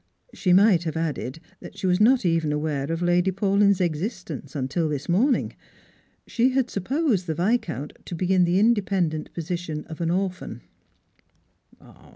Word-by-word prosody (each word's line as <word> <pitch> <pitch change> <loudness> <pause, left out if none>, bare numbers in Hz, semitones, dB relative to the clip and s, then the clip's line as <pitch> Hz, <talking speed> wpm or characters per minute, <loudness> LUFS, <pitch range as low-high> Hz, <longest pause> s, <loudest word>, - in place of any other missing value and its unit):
She 185 - 0
might 185 -2 +5
have 160 - -3
adJed, 155 -4 -3 0.2
that - - -12
she - - -4
was 180 +1 +2
not 240 0 +4
even 165 -3 +1
aware 150 -1 -2
of 165 +1 -2
Lady 175 +1 +2
Paulyn's 200 +1 +2
existence 175 - -3
until 145 +4 -1
this 145 -2 -4
morning. 235 +10 +1 0.7
She 245 +2 +1
had 260 -2 0
supposed 220 - 0
the 160 - -2
Viscount 170 - -1
to 175 - -6
be 185 +2 0
in 185 -1 +4
the 175 +1 +2
independent 195 -7 +1
position 170 -2 -4
of 160 0 -9
an 165 - 0
orphan. 185 +1 -3
175 Hz, 155 wpm, -24 LUFS, 160-200 Hz, 0.7 s, might